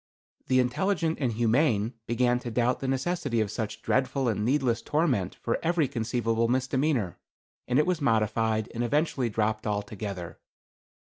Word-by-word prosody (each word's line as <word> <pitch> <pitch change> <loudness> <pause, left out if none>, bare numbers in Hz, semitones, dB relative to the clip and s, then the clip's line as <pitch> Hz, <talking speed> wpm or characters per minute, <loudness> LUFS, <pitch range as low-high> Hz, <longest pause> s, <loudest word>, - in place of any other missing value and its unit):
"The 130 -1 +3
intelligent 165 +6 0
and 125 -3 +1
humane 115 0 +2
began 120 +1 +2
to 125 - -6
doubt 120 +2 +1
the 135 - -3
necessity 135 -1 -1
of 110 -2 0
such 110 0 -4
dreadful 130 +1 +1
and 105 -2 0
needless 125 -2 +1
torment 135 - 0
for 115 - -2
every 165 -3 +2
conceivable 115 -1 0
misdemeanor, 130 - 0 0.5
and 125 - +1
it 150 - +4
was 180 -4 0
modified, 110 -2 +1
and 120 - -2
eventually 135 -1 +1
dropped 110 +1 -1
altogether. 100 -3 -4
120 Hz, 145 wpm, -27 LUFS, 110-135 Hz, 0.5 s, it